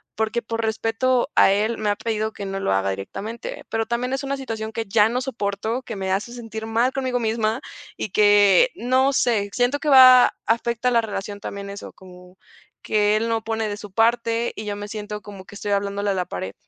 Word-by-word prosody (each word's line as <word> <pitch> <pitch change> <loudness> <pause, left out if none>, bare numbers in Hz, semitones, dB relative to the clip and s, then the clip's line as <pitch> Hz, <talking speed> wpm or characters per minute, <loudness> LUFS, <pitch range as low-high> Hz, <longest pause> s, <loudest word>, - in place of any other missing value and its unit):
porque 220 +2 -1
por 230 +1 -3
respeto 225 +4 0
a - - +6
él, 215 +4 0
me 215 -1 0
ha 205 - +1
pedido 220 -1 -2
que 200 - -7
no 195 0 -4
lo 145 - -1
haga, 95 0 +1
directamente, 195 - -7
pero 225 0 -1
también, 245 +2 -2
es 270 +1 -2
una 275 0 -2
situación 225 -4 -5
que 225 0 -4
ya 210 +1 +4
no 245 +2 -1
soporto, 225 -1 -3
que 235 -3 -7
me 190 -1 -3
hace 210 +5 -1
sentir 225 -2 -7
mal 235 +4 +1
conmigo 260 -2 -1
misma 225 0 0 0.4
y - - -4
que, 205 - +5
no 260 +3 +2
sé, 220 -6 +1
siento 250 +3 +1
que 300 - -2
va 255 -2 +8
afecta 235 +2 0
la 235 -1 +4
relación, 205 -2 -5
también 200 0 -7
eso, 200 - -9
como 180 0 -16 0.5
que 210 0 +2
él 225 +2 0
no 225 0 0
pone 220 -1 -2
de 205 - -4
su 205 -2 -10
parte 230 +1 +1
y 215 - -5
yo 205 -1 -3
me 205 0 -7
siento 210 0 -6
como 200 -3 -11
que 200 - -13
estoy 205 0 -4
hablándole 200 0 -1
a - - -1
la 180 -1 -1
pared. 95 - -6
220 Hz, 215 wpm, -22 LUFS, 205-235 Hz, 0.5 s, va